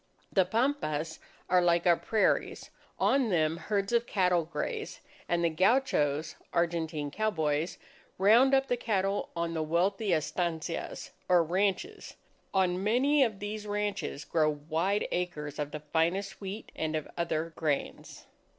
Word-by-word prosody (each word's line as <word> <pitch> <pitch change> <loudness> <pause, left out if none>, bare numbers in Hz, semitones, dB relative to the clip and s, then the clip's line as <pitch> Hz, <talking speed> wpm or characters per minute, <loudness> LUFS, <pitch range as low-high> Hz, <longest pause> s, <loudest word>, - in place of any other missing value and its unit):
The 190 -2 +4
pampas 185 - -1 0.3
are 180 0 +4
like 170 -1 +2
our 175 -1 +6
prairies. 215 +5 0 0.3
On 265 -4 +2
them 160 -4 +2
herds 200 +3 -2
of 235 0 +2
cattle 180 -4 +2
graze; 435 - -4 0.3
and 170 0 +1
the - - +3
gauchos 160 - +2 0.2
Argentine 165 -4 -1
cowboys, 160 -6 -1 0.4
round 235 +8 +6
up 270 0 +2
the 245 - 0
cattle 200 -4 -1
on 170 0 -2
the 160 - -1
wealthy 185 +6 +1
estancias 165 0 -2 0.2
or 175 -2 +5
ranches. 200 - -1 0.4
On 185 -1 +1
many 270 +7 +3
of 220 -5 -1
these 210 +1 -5
ranches, 205 -8 -3
grow 155 0 +2
wide 160 +7 -1
acres 150 -5 -3
of 145 -1 -2
the 150 0 -7
finest 165 +8 -1
wheat 200 +3 -6
and 160 0 -2
of 155 - -3
other 165 -1 -2
grains. 150 -4 -3
180 Hz, 140 wpm, -30 LUFS, 160-210 Hz, 0.4 s, our